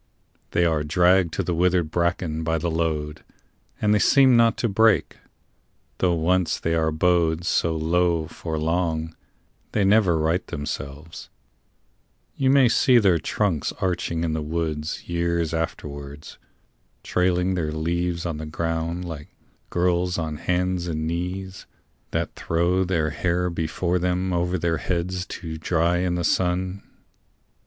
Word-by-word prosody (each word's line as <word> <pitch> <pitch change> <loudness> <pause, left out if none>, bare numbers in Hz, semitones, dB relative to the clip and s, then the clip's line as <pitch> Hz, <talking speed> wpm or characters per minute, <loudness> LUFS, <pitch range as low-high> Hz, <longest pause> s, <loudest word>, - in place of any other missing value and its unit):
They 85 - +2
are 80 -3 +1
dragged 90 +2 +3
to - - -1
the 90 - -1
withered 85 -1 +1
bracken 85 -2 -1
by 80 0 0
the 85 +1 -2
load, 80 -2 -2 0.6
And 105 -1 +2
they 105 - +3
seem 130 +3 +5
not 115 -1 +4
to 120 - 0
break; 110 +1 +2 0.8
though 90 -2 +2
once 90 +2 +1
they 85 - -1
are 80 -1 +1
bowed 85 0 +1
So 85 -2 +1
low 85 0 +1
for 80 0 -5
long, 80 0 -1 0.6
they 105 - +2
never 95 -4 +4
right 80 +4 +1
themselves: 75 +2 -6 1.1
You 130 - +1
may 135 -2 +6
see 125 +2 +4
their 95 -7 +4
trunks 90 -4 -1
arching 85 -3 -2
in 80 -2 -1
the 80 - -2
woods 80 0 -3
Years 85 -1 -1
afterwards, 75 -3 -5 0.6
trailing 90 +1 +1
their 80 -4 -1
leaves 85 +2 -2
on 85 -3 -3
the 80 0 -6
ground 80 +2 -2
Like 80 -4 -7 0.4
girls 90 0 +1
on 80 -2 -3
hands 90 +1 -1
and 80 -2 -2
knees 90 +3 -4 0.4
that - - -2
throw 85 +3 +1
their 85 -4 0
hair 90 +2 0
Before 85 +2 -1
them 90 +1 -1
over 90 +1 0
their 85 -1 0
heads 90 +2 -2
to 80 -2 -6
dry 85 +1 +1
in 90 0 0
the 85 - -2
sun. 90 +2 0
85 Hz, 145 wpm, -24 LUFS, 80-90 Hz, 1.1 s, may